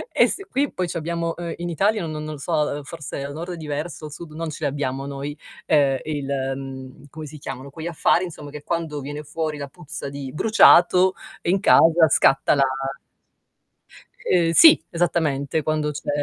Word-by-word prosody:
E - - +6
s - - -4
qui 280 +2 0
poi 180 -1 -2
c'abbiamo, 170 0 -3
uhm, 170 -1 -5
in 175 0 -4
Italia 200 +2 +1
n 155 - -5
no 155 - -5
non 155 0 -5
lo - - -8
so, 155 +5 -6
uhm, 150 -1 0
forse 140 -2 -7
al 140 0 -6
nord 170 +3 -6
è - - -7
diverso, 155 0 -5
sud 155 +1 -9
non 165 0 -4
ce 155 - -8
l'abbiamo 140 -1 -2
noi, 140 +1 -5 0.3
ehm, 140 -4 +3
il 145 -3 -4 0.3
uhm, 135 +1 -9
come 155 +1 -8
si 150 +1 -10
chiamano 135 0 -7
quegli 160 +3 -7
affari 170 +1 +2
insomma 150 -4 -9
che 150 - -8
quando 165 -3 -3
viene 145 +2 -6
fuori 155 0 -3
la 140 -1 -5
puzza 175 -2 -8
di 140 -2 -7
bruciato 185 -1 +5 0.3
in 185 +3 +2
casa 165 -3 +6
scatta 135 0 +4
la 140 - +2 1.6
Uhm, 170 -2 +3
sì, 315 - +8
esattamente. 160 -4 0
Quando 155 -1 0
c'è 150 - -7
155 Hz, 185 wpm, -22 LUFS, 140-170 Hz, 1.6 s, sì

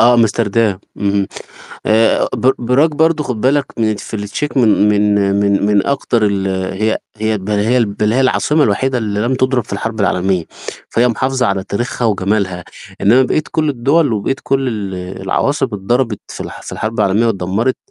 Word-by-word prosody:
آه، 120 +1 +6
أمستردام، 115 -3 +1 0.2
اهم، 100 -1 0 0.6
آآ، 110 +1 +3
ب 130 +1 +3
براج 125 +7 +2
برضه 160 0 +1
خُد 120 -6 -4
بالك 140 +1 +2
من 110 -2 +1
في 110 - -8
التشيك 105 +9 -4
من 110 -4 +4
من 105 0 +2 0.3
من 100 0 +2
من 105 -1 +2
أكتر 120 -5 +1
ال 100 -1 -1 0.3
هي 110 0 +1 0.2
هي 110 0 -1
بَل 95 +3 -4
هي 115 +4 +2
بَل 105 +1 -1
هي 130 - +2
العاصمة 145 +3 +2
الوحيدة 130 +5 0
اللي 105 -3 -2
لم 120 +4 0
تضرب 130 -2 +1
في - - -11
الحرب 110 +2 -3
العالمية، 95 -2 +1 0.5
فهي 120 +2 +3
محافظة 130 +2 0
على 95 -2 -1
تاريخها 120 +4 -2
وجمالها، 95 -3 -1 0.4
إنّما 120 +6 +5
بقية 155 +4 0
كل 155 -1 +1
الدول 140 +2 +2
وبقية 110 +5 -1
كل 135 -1 0
ال 100 -4 -4 0.3
العواصم 135 +8 0
اتضربت 110 +2 -1
في - - -9
الح - - -9
في - - -9
الحرب 110 0 -3
العالمية 105 +3 +2
واتدمّرت 105 +4 0
110 Hz, 175 wpm, -16 LUFS, 100-130 Hz, 0.6 s, آه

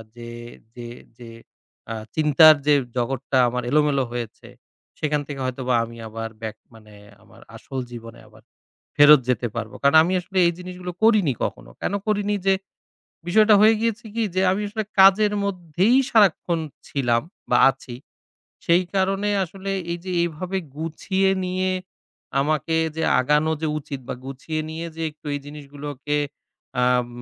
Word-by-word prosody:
যে 120 0 -9 0.4
যে 120 -1 -8 0.3
যে 120 -1 -11 0.6
আ - - -2 0.2
চিন্তার 155 0 +7
যে 150 - +6 0.2
জগৎটা 130 +2 -1
আমার 125 +1 -3
এলোমেলো 150 -2 +2
হয়েছে, 120 -2 -6 0.5
সেখান 150 -1 0
থেকে 140 -2 -6
হয়তোবা 130 0 -2
আমি 115 0 -9
আবার 115 +1 -6
ব্যাক 110 -1 -5 0.2
মানে, 110 -2 -16 0.3
আমার - - -19
আসল 135 - -6
জীবনে 115 -1 -10
আবার - - -20 0.5
ফেরত 145 0 +8
যেতে 125 -1 0
পারবো। 110 -2 -5
কারণ 140 +2 +4
আমি 180 - -1
আসলে 190 +2 -4
এই 170 - +2
জিনিসগুলো 180 0 -7
করিনি 215 -10 +4
কখনো। - - -6
কেন - - -1
করিনি, 205 -1 0
যে 195 - +5 0.7
বিষয়টা 215 +3 +5
হয়ে 220 +1 +6
গিয়েছে 230 0 -2
কি? 230 - 0
যে 185 - +2
আমি 195 +2 -1
আসলে 215 +1 -3 0.2
কাজের 200 +2 +6
মধ্যেই 185 - +1
সারাক্ষণ 185 -5 +3 0.3
ছিলাম 120 -4 0 0.3
বা 125 - +4
আছি। 125 -2 -7 0.7
সেই 170 +2 +4
কারণে 195 +1 +1 0.2
আসলে 195 +3 -7 0.2
এই 170 - -4
যে 185 - -5
এভাবে 180 +3 -3 0.2
গুছিয়ে 190 +5 -1
নিয়ে 185 +1 -1 0.7
আমাকে 155 +2 0 0.2
যে 160 - -2 0.2
আগানো 150 +4 +2
যে 160 - 0
উচিত, 140 -2 -7
বা - - -3
গুছিয়ে 140 +4 -5
নিয়ে 165 +1 -5
যে 165 - -5
একটু 155 +1 -19
এই 145 - -3
জিনিসগুলোকে 145 0 -6 0.7
আম 125 -1 +2
155 Hz, 150 wpm, -23 LUFS, 130-190 Hz, 0.7 s, ফেরত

